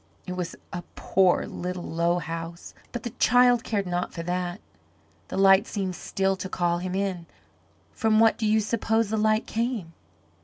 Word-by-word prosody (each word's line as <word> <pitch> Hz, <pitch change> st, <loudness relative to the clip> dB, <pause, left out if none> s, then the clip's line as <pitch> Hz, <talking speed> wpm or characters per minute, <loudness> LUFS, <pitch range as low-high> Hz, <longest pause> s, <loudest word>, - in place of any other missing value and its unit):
It 180 Hz, -, -6 dB
was 180 Hz, -2 st, -4 dB, 0.2 s
a 175 Hz, -, -3 dB
poor, 185 Hz, -2 st, +2 dB
little, 180 Hz, 0 st, -5 dB
low 170 Hz, +1 st, 0 dB
house, 165 Hz, 0 st, -6 dB, 0.2 s
but 240 Hz, -2 st, -5 dB
the 240 Hz, -, -4 dB
child 245 Hz, 0 st, +5 dB
cared 205 Hz, -3 st, -1 dB
not 180 Hz, 0 st, -2 dB
for 165 Hz, -, -6 dB
that. 180 Hz, +2 st, -2 dB, 0.7 s
The -, -, -5 dB
light 195 Hz, +2 st, +6 dB
seemed 190 Hz, -3 st, -3 dB
still 195 Hz, +1 st, -1 dB
to 190 Hz, 0 st, -5 dB
call 175 Hz, -1 st, 0 dB
him 185 Hz, +1 st, -3 dB
in. 190 Hz, -4 st, -2 dB, 0.7 s
From 220 Hz, -1 st, +2 dB
what 225 Hz, 0 st, +5 dB
do 220 Hz, -, +1 dB
you 215 Hz, +1 st, +3 dB
suppose 225 Hz, 0 st, 0 dB
the 220 Hz, -, +1 dB
light 215 Hz, +1 st, +2 dB
came? 225 Hz, -7 st, -2 dB
190 Hz, 170 wpm, -26 LUFS, 175-220 Hz, 0.7 s, light